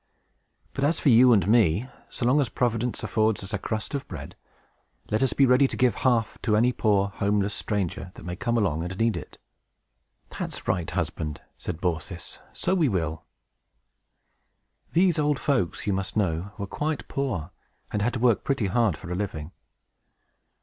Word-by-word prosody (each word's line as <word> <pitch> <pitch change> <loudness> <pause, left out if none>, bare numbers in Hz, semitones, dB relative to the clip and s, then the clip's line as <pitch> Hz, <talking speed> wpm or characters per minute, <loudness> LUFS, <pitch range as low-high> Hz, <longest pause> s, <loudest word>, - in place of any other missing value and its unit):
But, 135 - -2
as 155 +4 +2
for 145 - +3
you 125 +1 +7
and 100 -6 +4
me, 110 0 +3 0.2
so - - -4
long 135 +5 +4
as 130 - -1
Providence 120 0 -1
affords 110 -2 +1
us 95 - -8
a 100 - 0
crust 110 +5 -4
of 140 - -3
bread, - - -8 0.8
let 110 - +1
us 130 -5 +2
be 135 - +5
ready 130 +2 +5
to - - -6
give 125 -2 +3
half 120 -4 +1
to 110 -3 +2
any 120 +3 +4
poor, 100 -4 +2
homeless 100 0 0
stranger 95 -3 -3
that - - -11
may 90 0 -4
come 120 +6 0
along 85 -7 +1
and 90 +2 -5
need 115 0 +2
it." - - -8 1.0
"That's - - -5
right, 90 -3 0
husband!" 75 -2 -3 0.2
said 85 -3 -5
Baucis. 85 -1 -4
"So - - -1
we 165 -7 +3
will!" 80 -6 -2 1.7
These 175 -1 +4
old 150 -1 +2
folks, 125 - 0
you 100 - +1
must 95 +2 -3
know, 95 -1 0
were 100 - -3
quite 150 +9 -3
poor, 100 - -2 0.4
and 105 - -1
had 120 +4 +1
to - - -2
work 120 -2 +3
pretty 135 -6 0
hard 100 -3 +2
for 90 - -9
a - - -1
living. 85 -5 -4
110 Hz, 175 wpm, -26 LUFS, 95-125 Hz, 1.7 s, you